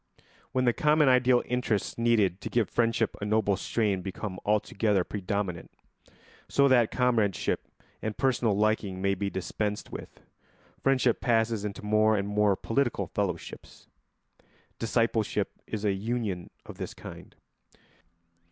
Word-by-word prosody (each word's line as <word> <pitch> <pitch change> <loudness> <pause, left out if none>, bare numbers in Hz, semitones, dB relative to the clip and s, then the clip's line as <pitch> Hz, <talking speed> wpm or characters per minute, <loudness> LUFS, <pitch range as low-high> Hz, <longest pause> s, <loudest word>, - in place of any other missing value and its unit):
] - - -31
When 130 0 +1
the 120 - +4
common 150 +1 +4
ideal 125 -1 +4
interests 120 -5 -1
needed 110 -6 +2
to - - -5
give 120 -3 0
friendship 115 -2 +1
a - - -3
noble 105 -1 +2
strain 100 -2 0
become 95 0 -5
altogether 105 -1 +1
predominant, 95 -3 -3 0.8
so 140 0 +4
that 120 -4 +5
comradeship 115 -7 0 0.3
and 110 -1 -4
personal 120 -5 +1
liking 105 -3 0
may 100 +1 +1
be 100 +1 -2
dispensed 105 +2 -3
with, - - -9 0.6
friendship 130 -3 +2
passes 115 -2 +1
into 105 0 -5
more 110 +1 +3
and 100 0 -1
more 105 -1 +2
political 115 -2 0
fellowships. 90 -2 -5 0.9
Discipleship 115 -1 0 0.2
is 110 -1 -4
a 100 - +3
union 105 -3 -3 0.2
of - - -11
this - - -5
kind. - - -11
110 Hz, 135 wpm, -28 LUFS, 100-120 Hz, 0.9 s, that